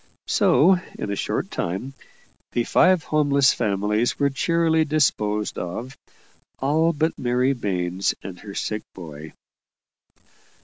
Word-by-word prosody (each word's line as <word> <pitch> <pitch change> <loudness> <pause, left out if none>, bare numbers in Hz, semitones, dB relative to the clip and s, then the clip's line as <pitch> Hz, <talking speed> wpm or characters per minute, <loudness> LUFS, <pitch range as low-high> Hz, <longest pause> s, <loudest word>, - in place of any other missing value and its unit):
So, 180 +4 +4 0.2
in 100 - -4
a - - -1
short - - -2
time, 95 +11 -3 0.6
the 120 - +1
five 185 +6 +3
homeless 140 -3 +3
families 105 +1 0
were 140 0 +1
cheerily 165 +2 +2
disposed 105 -9 0
of 115 +9 -6 0.6
all 155 +5 +2
but 160 +1 -1
Mary 125 +2 +1
Baines 95 -5 -1
and 90 -2 -8
her 100 -2 -10
sick 105 0 -2
boy. 80 -3 -9
125 Hz, 120 wpm, -23 LUFS, 100-150 Hz, 0.6 s, So